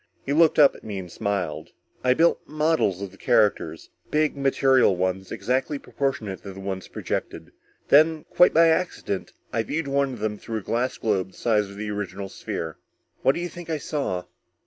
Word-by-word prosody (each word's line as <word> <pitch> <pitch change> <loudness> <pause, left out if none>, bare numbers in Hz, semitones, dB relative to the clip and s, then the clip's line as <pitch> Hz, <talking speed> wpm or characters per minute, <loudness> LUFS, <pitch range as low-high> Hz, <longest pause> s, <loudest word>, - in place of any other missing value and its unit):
He 140 - 0
looked 160 +1 +5
up 145 -3 +7
at - - -14
me 105 -2 -5
and 90 -2 -7
smiled. 90 -7 -2 0.3
"I 125 0 +4
built 170 +3 +3
models 150 - +1
of 100 - -6
the 95 - -18
characters. 105 -1 +1 0.2
Big 155 0 +1
material 135 -5 +3
ones, 95 +1 -2
exactly 130 +8 -1
proportionate 135 -9 -3
to 100 - -8
the 95 - -10
ones 95 -1 -4
projected. - - -4 0.4
Then 155 +1 +5
quite 180 - +6
by 165 +1 +6
accident 160 - -1 0.2
I 115 - +2
viewed 150 +6 -3
one 140 0 +1
of 120 - -8
them 105 -1 -2
through 115 -1 -4
a 105 - -5
glass 120 +5 -1
globe 95 -4 -1
the - - -17
size 105 -3 +1
of 100 - -11
the 105 0 -4
original 100 -1 -4
sphere. 80 -4 -5 0.4
What 135 - +3
do - - -3
you 175 - -2
think 175 -1 -10
I 160 - 0
saw?" 140 - -2
115 Hz, 190 wpm, -25 LUFS, 95-145 Hz, 0.4 s, up